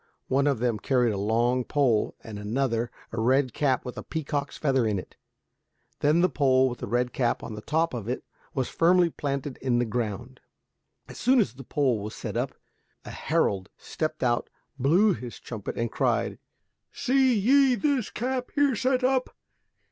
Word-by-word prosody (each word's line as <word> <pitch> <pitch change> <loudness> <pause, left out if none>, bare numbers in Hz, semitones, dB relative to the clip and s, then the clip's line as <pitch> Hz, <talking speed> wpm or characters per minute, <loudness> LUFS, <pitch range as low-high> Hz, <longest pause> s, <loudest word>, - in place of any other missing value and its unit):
One 140 +2 +2
of 140 -3 +2
them 115 -2 0
carried 125 0 +2
a - - -3
long 120 +5 +1
pole, 125 -6 +1
and 105 -2 -7
another 115 +2 -1 0.2
a 115 - -2
red 130 +1 +2
cap 135 -4 +1
with 125 - -6
a - - -7
peacock's 145 -3 -3
feather 135 -6 +1
in 105 -2 0
it. 90 - -8 0.8
Then 150 +4 +3
the 180 - +5
pole 130 -5 +3
with 120 - -7
the - - -5
red 125 +1 0
cap 120 -3 0
on 110 - -6
the 105 - -7
top 160 +6 0
of 115 -2 -4
it 125 - -3 0.3
was 130 -3 0
firmly 175 0 +3
planted 140 -2 -3
in 125 -2 0
the 120 - +2
ground. 120 +2 -4 0.7
As - - -10
soon 255 +1 +4
as 125 - +1
the 135 +1 -10
pole 130 -4 +1
was 105 +1 -6
set - - -6
up - - -2 0.5
a - - -7
herald 95 -1 0
stepped 155 -2 -4
out, 120 -1 +1 0.3
blew 180 - +4
his 120 0 -8
trumpet 110 -5 -6
and 115 -1 -1
cried, - - 0 0.5
"Se 255 - -3 0.2
ye 260 +5 +4
this 275 -4 0
cap 250 +1 -3
here 285 -3 +3
set 255 +2 +1
up? 255 0 +1
130 Hz, 180 wpm, -27 LUFS, 120-165 Hz, 0.8 s, the